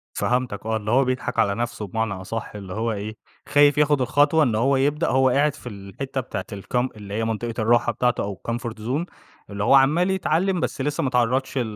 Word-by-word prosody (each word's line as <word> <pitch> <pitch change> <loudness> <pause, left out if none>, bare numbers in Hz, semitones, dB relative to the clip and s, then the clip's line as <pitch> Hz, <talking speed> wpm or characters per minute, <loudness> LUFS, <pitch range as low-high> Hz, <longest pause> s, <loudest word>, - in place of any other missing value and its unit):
فهمتك 125 -4 -1
آه. 110 0 0
اللي 105 0 -4
هو 130 +2 +4
بيضحك 130 -2 -2
على 100 -3 +2
نفسه 120 -3 -3
بمعنى 110 +1 -2
أصح، 100 +4 -5
اللي 95 -3 -7
هو 115 +1 -1
إيه، 110 +1 -5 0.3
خايف 145 0 +5
ياخد 150 -2 +3
الخطوة 145 +4 +3
إن 115 -5 +1
هو 135 +5 +2
يبدأ 145 +4 +1
هو 130 0 +3
قاعد 140 +3 +2
في 125 - -9
الحتّة 115 +7 -5
بتاعة 100 -5 -5
الكام 120 +6 -2
اللي 100 -2 -9
هي 110 +2 -1
منطقة 115 +1 -2
الراحة 120 +1 +3
بتاعته 125 +1 0
أو 100 -2 -6
الcomfort 115 -2 -4
zone. 135 +10 -1 0.4
اللي 100 0 -3
هو 105 - +4
عَمّال 155 +8 +4
يتعلّم 185 0 +1
بس 135 - -2
لسّه 145 +1 -1
ما 130 - +1
اتعرّضش 125 +2 0
ل - - +2
120 Hz, 210 wpm, -23 LUFS, 110-140 Hz, 0.4 s, خايف